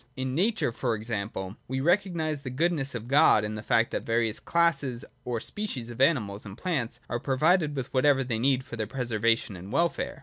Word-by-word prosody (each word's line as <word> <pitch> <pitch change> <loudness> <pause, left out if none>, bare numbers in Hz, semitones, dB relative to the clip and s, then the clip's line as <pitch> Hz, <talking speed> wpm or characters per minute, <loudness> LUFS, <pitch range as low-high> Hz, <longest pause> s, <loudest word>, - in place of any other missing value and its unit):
In 130 0 -2
nature, 195 - +1
for 115 0 -1
example, 105 -2 -4
we 130 +1 -2
recognise 160 -2 +1
the 135 - -5
goodness 145 0 0
of 115 0 -5
God 135 -6 +5
in 105 - -4
the 105 - -5
fact 115 +1 +2
that - - -1
the - - -15
various 115 -1 +1
classes 155 -8 +1 0.2
or 120 -2 -2
species 130 - -2
of 120 - -5
animals 110 -9 +2
and 100 0 -9
plants 150 -11 -2
are 120 - -2
provided 150 +4 +2
with 135 -2 -5
whatever 135 0 +4
they 115 -3 -2
need 130 +1 +2
for 115 - -8
their 110 -1 -2
preservation 115 -3 0
and 95 +3 -9
welfare. 170 -4 0
130 Hz, 200 wpm, -27 LUFS, 115-150 Hz, 0.2 s, God